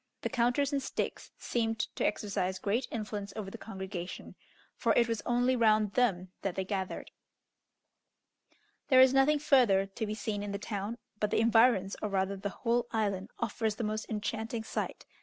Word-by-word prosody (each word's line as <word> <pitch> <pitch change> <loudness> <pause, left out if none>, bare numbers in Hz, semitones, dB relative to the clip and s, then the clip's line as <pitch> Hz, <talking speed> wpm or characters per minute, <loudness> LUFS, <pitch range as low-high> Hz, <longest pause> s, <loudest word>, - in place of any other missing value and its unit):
The - - 0
counters 260 +3 +1
and 280 - +1
sticks - - -3
seemed 225 -2 -1 0.2
to - - -1
exercise 190 -3 -1
great 210 +7 -1
influence 210 -3 -4
over 200 -3 -5
the 230 - -7
congregation, 190 -3 -6 0.4
for - - +2
it 235 - +4
was 230 -2 -1
only 245 +1 +3
round 215 -3 +3
them 190 -8 +1
that 195 -2 -2
they 190 - -2
gathered. 190 -1 -4 1.8
There 260 -2 +6
is 260 0 +7
nothing 270 +3 +5
further 245 -10 +4
to 200 +3 -4
be 210 - -3
seen 215 -2 -3
in 205 0 -4
the - - -1
town, 210 +2 -4 0.2
but 210 - +1
the - - +1
environs, 225 -3 +4
or 210 - -1
rather 195 0 0
the 195 +1 -4
whole 235 +3 0
island, 205 -2 -1
offers 225 -2 -1
the 230 - -4
most 215 0 -3
enchanting 220 +1 -3
sight. - - -4
215 Hz, 175 wpm, -31 LUFS, 200-235 Hz, 1.8 s, is